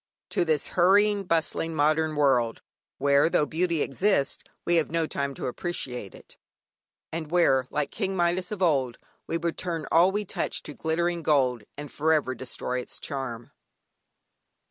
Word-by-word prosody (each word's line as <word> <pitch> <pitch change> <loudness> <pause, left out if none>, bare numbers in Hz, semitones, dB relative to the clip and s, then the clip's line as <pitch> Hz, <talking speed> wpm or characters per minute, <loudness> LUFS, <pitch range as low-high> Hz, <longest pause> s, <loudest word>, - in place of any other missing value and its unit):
to - - +1
this 155 -3 0
hurrying, 200 +3 +4
bustling 165 -1 0
modern 155 +1 +2
world, 125 -6 +2 0.3
where, 140 +2 +4
though 150 - +2
beauty 170 0 0
exists, 160 -1 0 0.2
we 175 0 +3
have 160 - +1
no 165 0 0
time 140 -2 -3
to - - -5
appreciate 125 - -4
it, - - -15 0.7
and 160 -2 -4
where, 135 -7 +3
like 150 -2 -2
King 195 -3 -2
Midas 175 +1 +1
of 200 -3 -2
old, 135 -8 +2 0.3
we 165 - -1
would 170 0 -3
turn 165 -4 -3
all 170 +3 +6
we 210 +1 -2
touch - - -2
to 150 - -8
glittering 170 +3 -1
gold, 130 -8 +2
and 145 -1 -7
for 160 +2 +1
ever 145 -4 +1
destroy 125 0 -4
its 125 - -8
charm. 120 -4 -5
160 Hz, 160 wpm, -27 LUFS, 140-175 Hz, 0.7 s, all